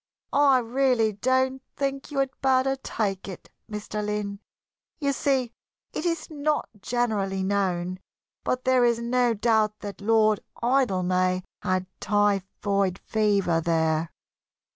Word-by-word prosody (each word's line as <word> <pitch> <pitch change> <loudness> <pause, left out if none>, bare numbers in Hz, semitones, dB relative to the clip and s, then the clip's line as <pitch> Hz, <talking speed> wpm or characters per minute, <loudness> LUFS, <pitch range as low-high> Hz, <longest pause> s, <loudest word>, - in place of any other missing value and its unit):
"I 280 -2 +5
really 245 -2 +2
don't 260 +4 +1
think 275 -1 -2
you 290 - -6
had 270 -1 +1
better 265 0 +3
take 205 -8 -3
it, 190 - -9 0.2
Mr. 210 0 -4
Lynn. 205 -1 -3 0.6
You 280 -2 +1
see, 265 -3 0 0.4
it 350 - -2
is 335 -2 -1
not 300 0 0
generally 205 -5 0
known, 185 -2 0 0.4
but 255 0 -1
there 255 -1 +4
is 235 -1 +3
no 240 0 +1
doubt 215 -1 +2
that 205 0 -7
Lord 215 0 +3 0.2
Idlemay 185 -7 +2 0.2
had 185 -1 0
typhoid 200 -1 +1
fever 200 -6 +2
there." 160 -1 +1
215 Hz, 120 wpm, -26 LUFS, 195-260 Hz, 0.6 s, I